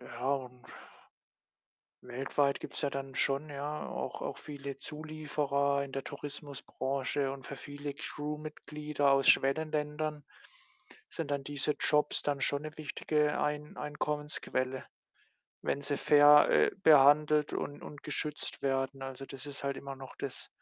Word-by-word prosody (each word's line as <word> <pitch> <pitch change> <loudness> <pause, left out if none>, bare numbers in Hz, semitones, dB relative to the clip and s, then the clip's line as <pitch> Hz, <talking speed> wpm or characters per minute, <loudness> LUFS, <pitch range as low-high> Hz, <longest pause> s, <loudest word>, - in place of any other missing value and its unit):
ja, 125 +3 -1
und 125 -2 -7 1.4
weltweit 135 +3 0
gibt’s - - -6
ja 145 - +1
dann 135 -1 -5
schon, 140 +4 +1
ja, 145 +2 -4
auch - - -4
auch - - -4
viele 140 -2 -7
Zulieferer 150 -2 -1
in 135 - -10
der 135 -1 -3
Tourismusbranche 140 -1 -3
und 135 -1 -9
für 140 - -6
viele 145 +1 -6
Crew-Mitglieder 150 -1 -2
aus 135 0 +4
Schwellenländern 150 +1 +2 0.9
sind 160 -4 -4
dann 140 -1 -1
diese 145 +1 -1
Jobs 150 0 +2
dann 145 -1 0
schon 140 +1 +1
’ne 155 0 -7
wichtige 150 0 0
Ein 150 0 -2
Einkommensquelle, 150 -3 -2 0.8
wenn 140 - -1
sie 145 0 -1
fair, 150 0 +7
äh, - - +5
behandelt 150 0 +6
und 145 - -3
und 145 - -10
geschützt 150 0 -3
werden. 135 0 0
Also, 135 0 -6
das 135 0 -9
ist 140 -1 -8
halt 140 -1 -1
immer 140 0 -6
noch 135 -1 -10
das - - -6
145 Hz, 135 wpm, -32 LUFS, 135-150 Hz, 1.4 s, fair